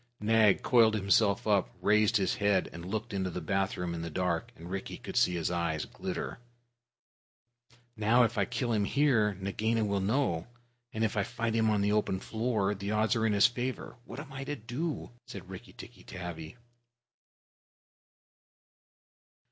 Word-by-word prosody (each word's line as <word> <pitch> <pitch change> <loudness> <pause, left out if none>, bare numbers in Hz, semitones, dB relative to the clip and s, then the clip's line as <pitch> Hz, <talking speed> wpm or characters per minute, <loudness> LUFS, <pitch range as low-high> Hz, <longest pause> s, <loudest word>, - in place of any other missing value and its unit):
Nag 110 -2 +4
coiled 115 -3 +5
himself 100 0 +2
up, 100 -3 +2
raised 105 +3 +3
his 95 -2 +1
head, 100 -2 +2
and 85 +1 -8
looked 110 +1 -3
into 95 -2 -1
the 90 - -4
bathroom 95 -3 -1
in 85 - -4
the 85 - -4
dark, 85 0 -1
and 85 - -11
Rikki 95 0 -4
could - - -8
see 90 - +3
his 85 0 -1
eyes 85 -3 -1
glitter. - - -5 1.6
"Now, 110 +3 +4
if 115 +1 0
I 100 -3 +2
kill 120 +3 -2
him 105 -2 +2
here, 115 -6 +2
Nagaina 110 +4 -1
will 100 -1 0
know; 100 - 0 0.4
and 110 - -2
if 110 - 0
I 105 - +2
fight 115 +1 -2
him 110 -1 +2
on 105 -2 +2
the 100 +1 +2
open 105 -3 +1
floor, 110 -2 -1
the 100 0 -5
odds 110 +1 +2
are 110 -1 +2
in 105 - +1
his 100 - +5
favor. 125 +1 -2
What 125 - -8
am 140 -2 -9
I 135 0 -5
to 145 - -3
do?" 135 +7 -4 0.2
said - - -9
Rikki - - -10
tikki - - -12
tavi. 85 0 -7
105 Hz, 170 wpm, -30 LUFS, 95-115 Hz, 1.6 s, coiled